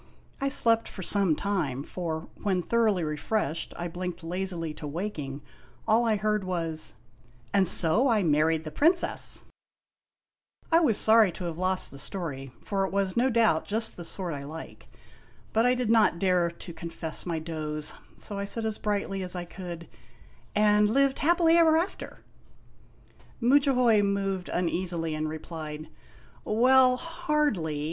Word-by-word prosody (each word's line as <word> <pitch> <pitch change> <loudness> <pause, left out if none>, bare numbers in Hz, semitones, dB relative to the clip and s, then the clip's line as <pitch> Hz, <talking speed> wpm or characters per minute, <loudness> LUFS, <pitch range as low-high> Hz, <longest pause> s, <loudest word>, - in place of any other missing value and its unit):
I 275 - +1
slept 230 -4 +3 0.2
some 195 -6 +3
time, 155 -10 -2
for 160 -1 -4 0.2
when, 185 -3 0
thoroughly 220 -5 +1
refreshed, 155 +2 -2
I 175 - -3
blinked 180 0 -6
lazily 175 -2 -1
to 150 - -7
waking, 145 -4 -5 0.4
all 225 +2 +3
I 220 - +3
heard 210 0 0
was: 165 -4 -2 0.3
" 120 0 -30
And 195 -2 +3
so 180 +11 +3
I 220 -5 +2
married 160 0 +2
the 155 - -7
Princess! 335 - +1 0.6
" - - -36
I 330 - +6
was 255 -11 +2
sorry 220 -3 +5
to 180 - -7
have 170 -1 -4
lost 185 0 0
the 140 - -8
story, 135 -7 -3
for 195 -2 -1
it - - -8
was, 195 -1 0
no 245 +3 +3
doubt, 225 -9 +2
just 220 +2 -1
the 175 - -8
sort 175 0 -1
I 140 -1 -6
like. 160 +3 -9 0.7
But 225 +2 +3
I 250 - +3
did 245 -3 0
not 220 -6 +4
dare 180 -2 +2
to 170 +1 -10
confess 165 0 -4
my 170 -2 -1
doze, 155 -2 -4 0.2
so 200 -1 -6
I 200 - -2
said 225 +3 -1
as 220 -1 -3
brightly 200 -2 -2
as 185 0 -5
I 175 -1 -4
could: 170 -1 -8 0.4
" - - -29
And 210 0 +4
lived 275 +3 +2
happily 335 +1 +4
ever 320 -2 +5
after! 345 +4 -4 0.7
" - - -29
Mudjahoy 250 -3 +4
moved 195 -2 -1
uneasily, 170 -2 -1
and 155 0 -2
replied: 155 -1 -7 0.5
"Well, 255 +3 +4
hardly. 300 - -1
190 Hz, 160 wpm, -27 LUFS, 165-225 Hz, 0.7 s, I